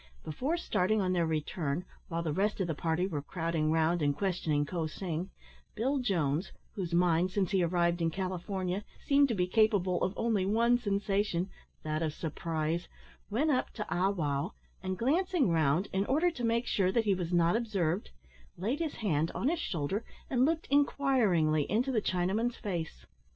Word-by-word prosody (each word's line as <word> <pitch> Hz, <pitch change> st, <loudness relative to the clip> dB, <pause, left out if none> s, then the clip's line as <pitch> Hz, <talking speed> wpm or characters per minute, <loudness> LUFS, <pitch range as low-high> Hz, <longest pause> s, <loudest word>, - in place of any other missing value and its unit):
Before 265 Hz, -, -2 dB
starting 215 Hz, -, +1 dB
on 185 Hz, -2 st, +1 dB
their 170 Hz, -2 st, +1 dB
return, 155 Hz, +1 st, -2 dB, 0.2 s
while 170 Hz, -1 st, -2 dB
the 155 Hz, -3 st, -1 dB
rest 205 Hz, +5 st, 0 dB
of 190 Hz, -, +1 dB
the 165 Hz, -, -1 dB
party 160 Hz, +3 st, 0 dB
were 160 Hz, -7 st, -3 dB
crowding 165 Hz, 0 st, -1 dB
round 165 Hz, +1 st, +2 dB
and 145 Hz, -1 st, +1 dB
questioning 165 Hz, -6 st, 0 dB
Ko 165 Hz, 0 st, -2 dB
sing, 175 Hz, +2 st, -4 dB, 0.5 s
Bill 270 Hz, +6 st, 0 dB
Jones 170 Hz, -, 0 dB, 0.2 s
whose 185 Hz, -5 st, -4 dB
mind 175 Hz, 0 st, +3 dB
since 190 Hz, 0 st, 0 dB
he 190 Hz, -2 st, +3 dB
arrived 170 Hz, 0 st, +1 dB
in 165 Hz, -, +2 dB
California 185 Hz, +2 st, -3 dB, 0.2 s
seemed 280 Hz, 0 st, +5 dB
to 235 Hz, -, -1 dB
be 180 Hz, -2 st, +2 dB
capable 190 Hz, -3 st, +2 dB
of 190 Hz, -, -1 dB
only 225 Hz, -4 st, +1 dB
one 230 Hz, +5 st, +3 dB
sensation, 200 Hz, -4 st, 0 dB, 0.3 s
that 155 Hz, 0 st, -2 dB
of 155 Hz, -2 st, -1 dB
surprise 160 Hz, +1 st, -2 dB, 0.4 s
went 280 Hz, +9 st, +1 dB
up 255 Hz, -, +1 dB
to 210 Hz, -, -4 dB
Ah 185 Hz, +2 st, +2 dB
wow, 155 Hz, -1 st, -1 dB, 0.3 s
and 185 Hz, 0 st, -3 dB
glancing 310 Hz, -, +2 dB
round, 160 Hz, +3 st, +2 dB
in 195 Hz, +1 st, 0 dB
order 320 Hz, +6 st, +3 dB
to 245 Hz, -7 st, -7 dB
make 230 Hz, +1 st, +1 dB
sure 190 Hz, -5 st, +1 dB
that 225 Hz, +2 st, +1 dB
he 200 Hz, -, +3 dB
was 180 Hz, -2 st, -3 dB
not 175 Hz, +1 st, +3 dB
observed, 195 Hz, -6 st, -1 dB, 0.5 s
laid 225 Hz, -, -1 dB
his 325 Hz, -3 st, -2 dB
hand 165 Hz, -7 st, 0 dB
on 260 Hz, -, +1 dB
his 340 Hz, 0 st, -1 dB
shoulder, 185 Hz, -, -2 dB, 0.3 s
and 255 Hz, -1 st, +4 dB
looked 320 Hz, +2 st, 0 dB
inquiringly 220 Hz, -, +3 dB
into 240 Hz, +7 st, +1 dB
the 225 Hz, -4 st, +1 dB
Chinaman's 200 Hz, +7 st, 0 dB
face. 170 Hz, -6 st, -4 dB
185 Hz, 175 wpm, -31 LUFS, 165-225 Hz, 0.5 s, seemed